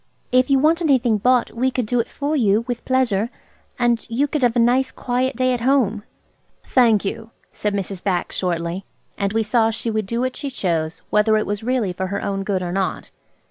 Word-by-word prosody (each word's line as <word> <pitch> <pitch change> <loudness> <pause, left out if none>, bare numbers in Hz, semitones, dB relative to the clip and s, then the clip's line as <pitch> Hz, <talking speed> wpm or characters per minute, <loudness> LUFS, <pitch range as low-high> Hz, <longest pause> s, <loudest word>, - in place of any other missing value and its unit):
"If 255 +2 +3
you 275 - +5
want 315 +5 +3
anything 255 -8 +2
bought 250 +3 +2
we 255 +3 0
could 250 -2 -2
do 245 +3 0
it 230 - -1
for 290 +2 -2
you, 220 -4 +2
with 245 -1 -3
pleasure, 235 -5 +1 0.5
and 240 -2 +1
you 245 +5 +1
could 295 0 -2
have 245 -2 +2
a - - +3
nice, 250 +3 +3
quiet 255 +2 -1
day 255 +1 +1
at 245 - -2
home." 235 -5 +2 0.6
"Thank 230 -6 +3
you," 225 +3 -4 0.2
said 210 -1 -2
Mrs. 195 -2 -4
Bax 185 -3 -1
shortly; 175 +1 -2 0.3
and 200 -1 -1
we 225 +1 +1
saw 225 +1 +2
she 225 +1 -3
would 215 -2 -2
do 235 +3 -1
what 255 0 -1
she 285 - -4
chose, 165 -9 -2
whether 215 +1 +4
it 215 - 0
was 205 0 -3
really 235 -6 0
for 190 +1 -3
her 200 +2 -3
own 195 -1 -2
good 190 -2 -1
or 175 - -3
not. 190 -2 -2
230 Hz, 215 wpm, -21 LUFS, 200-255 Hz, 0.6 s, you